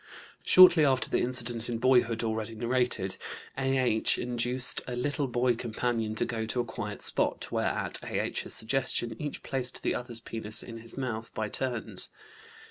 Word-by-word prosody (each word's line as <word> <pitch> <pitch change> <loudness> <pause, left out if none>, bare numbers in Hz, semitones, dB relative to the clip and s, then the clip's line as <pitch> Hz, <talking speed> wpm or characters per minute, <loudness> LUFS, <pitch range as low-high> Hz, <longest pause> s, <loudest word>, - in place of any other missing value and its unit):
Shortly 180 -3 +8
after 130 -3 +1
the - - +2
incident 120 -2 0
in 120 - -2
boyhood, 120 -2 +2
already 110 0 -3
narrated, 120 -5 0 0.4
A.H. 130 -4 +2
induced 125 +1 +2
a 125 - -4
little 145 +3 -1
boy 125 0 +1
companion 115 -1 -2
to - - +1
go 110 -2 -3
to 125 - -2
a 120 - 0
quiet 110 -2 -6
spot, - - 0
where, - - 0
at - - -1
A.H.'s - - -2
suggestion, 120 0 +1
each 150 -1 -5
placed 130 -2 -3
the - - +1
other's 120 -2 -3
penis 110 -2 -2
in 115 -1 -9
his 115 +2 -10
mouth 115 -4 -4
by 110 -1 -2
turns. 125 -2 -2
120 Hz, 160 wpm, -29 LUFS, 115-130 Hz, 0.4 s, Shortly